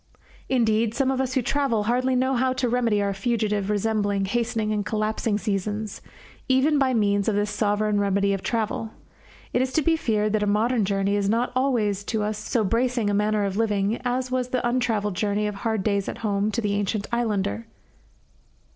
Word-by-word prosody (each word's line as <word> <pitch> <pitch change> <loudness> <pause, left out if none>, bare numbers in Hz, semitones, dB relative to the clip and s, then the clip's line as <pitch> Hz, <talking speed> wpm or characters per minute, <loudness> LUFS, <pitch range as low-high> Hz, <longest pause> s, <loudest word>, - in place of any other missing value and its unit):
Indeed, 225 -3 +2
some 270 0 +1
of 265 0 0
us 260 0 -2
who 260 - +2
travel 265 -5 +1
hardly 250 +4 +1
know 260 +1 +1
how 255 +1 +1
to 255 -1 -1
remedy 230 -4 +1
our 200 0 0
fugitive, 210 -1 -1
resembling, 205 -1 0
hastening, 225 0 -1
and 210 -1 -1
collapsing 215 +1 -1
seasons, 210 0 -3 0.5
even 275 +3 +3
by 265 -1 +2
means 200 -2 +1
of 210 - 0
this 205 0 0
sovereign 210 0 +1
remedy 200 0 +1
of 195 - -3
travel. 225 0 -2 0.6
It 245 - +2
is 260 0 0
to 315 - +2
be 325 +3 +3
feared 215 -8 0
that 215 - +1
a 210 - +1
modern 220 +2 +2
journey 195 0 0
is 200 -1 0
not 235 +3 +1
always 225 -7 +1
to 220 -3 -1
us 210 0 -2
so 220 +1 0
bracing 230 0 +1
a - - -1
manner 210 0 +1
of 195 0 -3
living 210 0 0
as 250 0 -1
was 255 -1 0
the 250 -1 0
untravelled 225 -5 0
journey 205 +1 0
of 210 - -2
hard 215 0 -2
days 200 -1 0
at - - -6
home 200 0 +1
to 235 +2 -2
the 205 -2 -1
ancient 205 +1 -1
islander. 205 - -1
215 Hz, 195 wpm, -24 LUFS, 205-245 Hz, 0.6 s, even